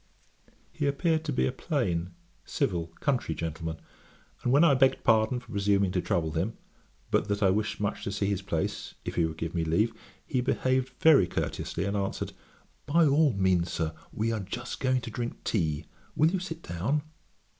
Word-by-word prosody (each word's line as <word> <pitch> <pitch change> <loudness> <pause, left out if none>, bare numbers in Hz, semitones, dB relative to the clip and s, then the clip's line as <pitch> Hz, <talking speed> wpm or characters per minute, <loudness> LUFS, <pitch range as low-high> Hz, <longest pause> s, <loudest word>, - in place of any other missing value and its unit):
He 145 - -1
appeared 160 +3 +1
to 150 - -1
be 130 - +2
a - - +1
plain, 110 - -1 0.3
civil, 90 - -1
country 125 - 0
gentleman; 80 0 -4 0.6
and 120 - +1
when 145 +5 +6
I 165 -4 +6
begged 135 0 +3
pardon 110 +2 +3
for 120 - -15
presuming 100 -2 +2
to 90 - 0
trouble 80 -3 0
him, 85 +9 -2 0.5
but - - +2
that 100 0 0
I 95 - +5
wished 105 +1 -1
much 105 -1 -2
to 100 - -2
see 100 0 -1
his 100 -1 0
place, 90 -5 -3
if - - -3
he 85 - +2
would 80 -1 -4
give 80 +1 -4
me 85 -2 0
leave; 105 +8 +2 0.3
he 130 - 0
behaved 130 0 +1
very 150 - +6
courteously, 85 0 -2
and 100 +1 -1
answered, 100 -1 -2 0.5
'By 165 +3 +5
all 145 -1 +4
means, 95 -3 +2
Sir; 80 -1 -1 0.2
we 115 +2 -1
are 110 - -1
just 120 +6 -5
going 130 -1 +2
to 115 - -6
drink 120 0 -4
tea; 80 -7 0 0.3
will 155 +2 +4
you 190 - 0
sit 170 -2 -6
down?' 115 - -1
105 Hz, 190 wpm, -29 LUFS, 90-135 Hz, 0.6 s, when